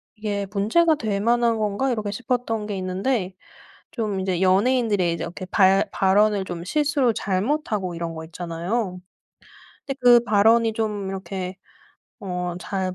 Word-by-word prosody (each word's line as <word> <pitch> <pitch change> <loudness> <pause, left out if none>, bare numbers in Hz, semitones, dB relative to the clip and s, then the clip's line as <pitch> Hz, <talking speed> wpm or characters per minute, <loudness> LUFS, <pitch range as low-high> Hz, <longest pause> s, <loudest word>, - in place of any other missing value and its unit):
'이게 205 -2 -3
문제가 230 +12 +3
될 215 -8 -2
만한 235 +1 +2
건가?' 215 +5 0
이렇게 215 -4 -2
싶었던 225 -1 -2
게 210 -1 -4
있는데 190 +2 -2 0.6
좀 210 -5 -2
이제 185 -2 -1
연예인들의 200 -2 +2
이제 - - -4
이렇게 175 +2 -7
발 190 0 +3
발언을 200 +1 +2
좀 175 -2 -6
실수로 290 - +1
잘못하고 205 - -1
이런 165 0 -4
거 160 0 -7
있잖아요. 175 +4 -3 0.9
근데 275 -1 -4
그 240 -1 +8
발언이 225 +1 +4
좀 210 -3 -2
이렇게 190 -1 -5 0.6
어 180 -2 -3
잘 190 -1 -3
205 Hz, 295 characters per minute, -23 LUFS, 185-230 Hz, 0.9 s, 그